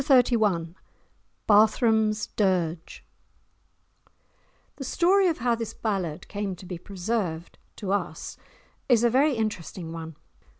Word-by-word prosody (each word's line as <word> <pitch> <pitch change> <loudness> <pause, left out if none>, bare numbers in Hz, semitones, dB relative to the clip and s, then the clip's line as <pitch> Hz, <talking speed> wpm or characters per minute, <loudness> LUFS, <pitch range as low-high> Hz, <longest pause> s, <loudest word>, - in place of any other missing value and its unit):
*Chapter 255 -4 +5
XXXI* 170 -6 0 0.7
*Barthram's 215 0 +4
Dirge* 175 -5 -1 1.7
The 275 - -5
story 370 +7 +3
of 330 - 0
how 240 0 +1
this 230 -1 -4
ballad 185 -7 -3
came 205 -2 -4
to 180 - -13
be 180 -2 -6
preserved 185 -3 -3 0.2
to 195 -3 -4
us 175 -5 -3 0.5
is 240 -2 +5
a 235 - +4
very 275 +3 +3
interesting 185 -6 -4
one. 165 -1 -7
210 Hz, 120 wpm, -26 LUFS, 175-235 Hz, 1.7 s, Chapter